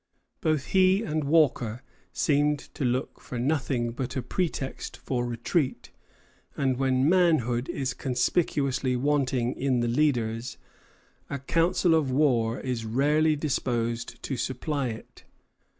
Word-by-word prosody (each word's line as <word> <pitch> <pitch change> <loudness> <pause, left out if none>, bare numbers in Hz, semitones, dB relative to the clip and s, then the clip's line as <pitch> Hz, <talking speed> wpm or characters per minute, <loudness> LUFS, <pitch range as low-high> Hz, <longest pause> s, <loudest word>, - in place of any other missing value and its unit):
Both 155 -3 +1
he 190 +2 +4
and 155 -5 -2
Walker 135 -6 +2 0.3
seemed 145 0 +2 0.2
to - - -4
look 125 +2 -1
for 125 - -7
nothing 125 -2 0
but 125 +1 -4
a 130 - -2
pretext 140 -1 -3
for 125 -2 -2
retreat; 120 +5 -1 0.7
and 130 -2 +1
when 130 0 +2
manhood 155 -9 +2
is 135 -1 -2
conspicuously 130 0 0
wanting 130 -2 +1
in 130 -3 0
the 120 - 0
leaders, 120 -3 0 0.7
a 140 - -3
council 165 +5 +2
of 155 -4 +2
war 125 -4 +2
is 125 -3 -3
rarely 150 +7 +2
disposed 120 -5 -2
to 135 - -3
supply 135 +3 -2
it. 110 -2 -9
135 Hz, 125 wpm, -27 LUFS, 120-150 Hz, 0.7 s, he